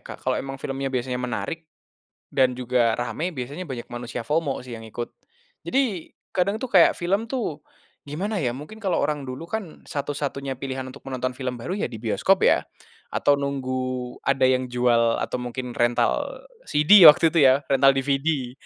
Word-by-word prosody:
Kalau - - -2
emang 135 0 -5
filmnya 135 0 -3
biasanya 125 0 -2
menarik 155 +6 -4 0.7
dan 130 -2 +2
juga 125 -2 +1
rame 160 +8 -3
biasanya 145 +7 -5
banyak 120 -3 -5
manusia 120 -1 -5
FOMO 145 -2 -1
sih 125 - -9
yang 115 - -10
ikut. 120 +2 -6 0.5
Jadi 240 -11 -1 0.2
kadang 200 +3 +1
tuh 255 +2 -6
kayak 180 -4 +6
film 195 +6 -1
tuh, 220 - -3 0.5
gimana 190 +7 -2
ya, 125 -2 -1
mungkin 215 +10 -10
kalau 190 -4 0
orang 145 -2 -2
dulu 130 +6 -6
kan 190 -2 -6
satu-satunya 140 -2 -4
pilihan 130 0 -4
untuk 140 +2 -13
menonton 130 -1 -3
film 125 -3 -4
baru 180 - -3
ya, - - -1
di 115 -3 -9
bioskop 155 - +2
ya, - - +4 0.5
atau 145 - +3
nunggu 130 -3 -3
ada 135 -1 +2
yang 130 0 +2
jual 120 -2 +2
atau - - -2
mungkin 125 0 -5
rental 120 - 0 0.2
CD 170 +6 +6
waktu 155 +2 +7
itu 170 - +2
ya, 130 +1 +6
rental 135 0 +5
DVD. 135 -1 -1
135 Hz, 165 wpm, -24 LUFS, 125-160 Hz, 0.7 s, waktu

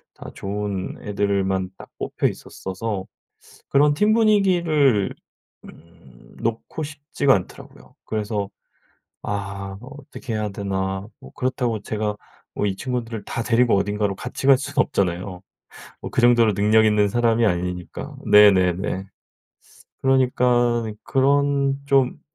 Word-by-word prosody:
다 - - -10
좋은 100 -1 -4
애들을 100 -1 0
만 95 -1 -1
딱 - - -12
뽑혀 - - -3
있었어서 95 0 -5 0.6
그런 145 +1 +4
팀 210 +7 +3
분위기를 175 - +3 0.5
음 80 -7 -17
놓고 115 +7 -3
싶지가 145 -2 +1
않더라고요. 90 - -8
그래서 105 -2 -2 0.7
아 100 -1 -5
어떻게 135 -2 -9
해야 105 -1 -1
되나 95 0 -3
뭐 - - -13
그렇다고 125 -3 -1
제가 105 -1 -2 0.4
뭐 105 - 0
이 95 - 0
친구들을 115 -3 -4
다 115 - -3
데리고 120 -2 +3
어딘가로 100 0 -1
같이 125 +2 -5
갈 135 - +7
순 140 +2 -6
없잖아요, 90 -6 0 0.6
뭐 - - -5
그 - - +1
정도로 120 -3 +5
능력 110 +2 +4
있는 105 -1 +3
사람이 115 0 +2
아니니까. 90 -1 -4
네네네. 95 -2 +4 1.0
그러니깐 120 -3 +2
그런 140 0 +2
좀 135 -2 +2
110 Hz, 265 characters per minute, -22 LUFS, 100-130 Hz, 1.0 s, 갈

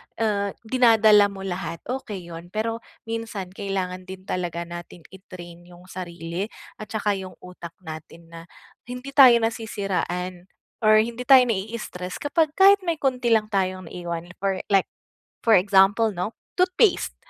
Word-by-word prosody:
ah, 200 -3 -1
dinadala 220 -4 +5
mo 195 -1 -9
lahat 180 -3 -5
okey 205 -9 -6
'yon, 165 +1 -9
pero 220 +4 -3 0.2
minsan 225 -5 -5
kailangan 185 -2 -4
din 185 0 -9
talaga 175 -3 -3
natin 175 0 -10
i-train 175 -3 -12
'yong 175 0 -15
sarili 175 +1 -5 0.3
at 215 - -7
saka 210 0 -1
'yong 190 -2 -5
utak 175 -2 -10
natin 160 +1 -10
na 165 - -9 0.5
hindi 250 +2 -7
tayo 265 -4 +8
nasisiraan 190 -5 -3 0.3
or 215 -1 +5
hindi 235 +2 -6
tayo 265 -2 +8
nai-i-stress 200 -5 -4
kapag 310 +1 +1
kahit 395 +1 +7
may 335 - +1
konti 255 -5 -1
lang 215 -1 -1
tayong 185 -3 -2
iwan 175 -1 -6
for 195 -1 -1
like 195 -1 +4 0.5
for 225 -2 +4
example 195 +3 +4
'no, 185 +4 -4 0.2
toothpaste 365 +3 +2
195 Hz, 140 wpm, -24 LUFS, 180-225 Hz, 0.5 s, tayo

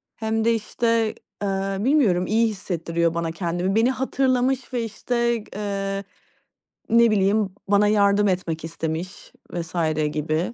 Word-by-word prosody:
Hem 220 0 -1
de 230 - +4
işte, 225 0 0 0.3
eee, 195 0 -1
bilmiyorum, 215 -8 +3
iyi 225 +2 +3
hissettiriyor 170 -5 -1
bana 170 -1 -2
kendimi. 175 +3 -2
Beni 230 +3 +4
hatırlamış 260 -1 0
ve 240 -2 0
işte, 235 +1 -1
eee, 195 -1 -3 0.9
ne 235 0 +5
bileyim, 200 -1 +2
bana 205 +1 +4
yardım 205 0 +3
etmek 175 -4 -1
istemiş 165 +2 -5 0.2
vs. 175 0 -5 0.4
gibi. 155 +7 -1
200 Hz, 125 wpm, -23 LUFS, 180-230 Hz, 0.9 s, ne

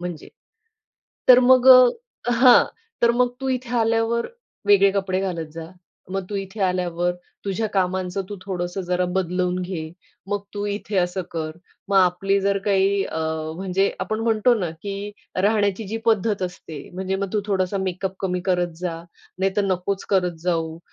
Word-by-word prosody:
म्हणजे, 175 -3 -6 1.0
तर 250 - +10
मग 255 +1 +5
अ, 255 - +5
हां, 245 +1 +7 0.4
तर 235 - +6
मग 250 0 +3
तू 265 - -2
इथे 255 -2 -2
आल्यावर 230 +1 +1 0.4
वेगळे 200 -1 +6
कपडे 190 -1 -1
घालत 170 -5 -3
जा, 165 +1 -7 0.4
मग 195 +1 -2
तू 205 - -4
इथे 195 +2 -6
आल्यावर 175 -1 0 0.3
तुझ्या 200 +3 -1
कामांचं 185 0 0
तू 205 - -6
थोडंसं 180 -1 -3
जरा 180 0 0
बदलून 180 0 0
घे, 165 -4 -5 0.4
मग 205 -1 -1
तू 205 - -3
इथे 205 0 -3
असं 180 +1 0
कर. 160 -1 -3 0.4
मग 200 - +2
आपली 195 +2 +3
जर 200 0 +1
काही 200 -1 +2
अ, 160 - -5 0.4
म्हणजे 190 +1 0
आपण 215 +1 -2
म्हणतो 225 +1 +3
ना 175 -4 -2
की 200 0 -5 0.3
राहण्याची 205 0 +1
जी 220 - -3
पद्धत 215 -2 +2
असते, 180 -4 -6 0.2
म्हणजे 190 +1 -2
मग 195 0 -4
तू 210 - +1
थोडासा 195 -1 0
मेकअप 190 0 -3
कमी 180 -2 -1
करत 180 -2 0
जा, 175 -2 -3 0.4
नाहीतर 195 +2 +1
नकोच 190 +1 -1
करत 180 -3 +1
जाऊ. 165 -2 -1
195 Hz, 160 wpm, -23 LUFS, 180-210 Hz, 1.0 s, तर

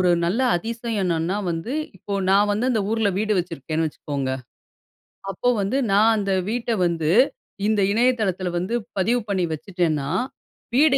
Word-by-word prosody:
ஒரு 180 -1 +4 0.2
நல்ல 195 +9 +1 0.2
அதிசயம் 230 +3 -3
என்னன்னா 170 +2 0
வந்து, 165 +9 -3 0.3
இப்போ 200 +3 -5 0.2
நான் 205 +1 +4
வந்து 225 +5 0
அந்த 220 -3 +1
ஊரில 220 -2 +2
வீடு 210 -1 +1
வச்சிருக்கேன்னு 160 -1 -3
வச்சுக்கோங்க. 140 -3 -4 1.0
அப்போ 220 +6 0
வந்து, 200 +7 0 0.2
நான் 215 +3 +5
அந்த 200 -2 0 0.2
வீட்ட 240 0 -2
வந்து 165 -2 0 0.6
இந்த 215 -1 +2
இணையதளத்தில 215 -6 +1
வந்து 185 +6 -3 0.2
பதிவு 230 +6 +2
பண்ணி 190 -2 +1
வச்சுட்டேன்னா 160 -4 -1 0.7
வீடு 280 +1 +5
195 Hz, 140 wpm, -23 LUFS, 170-225 Hz, 1.0 s, நான்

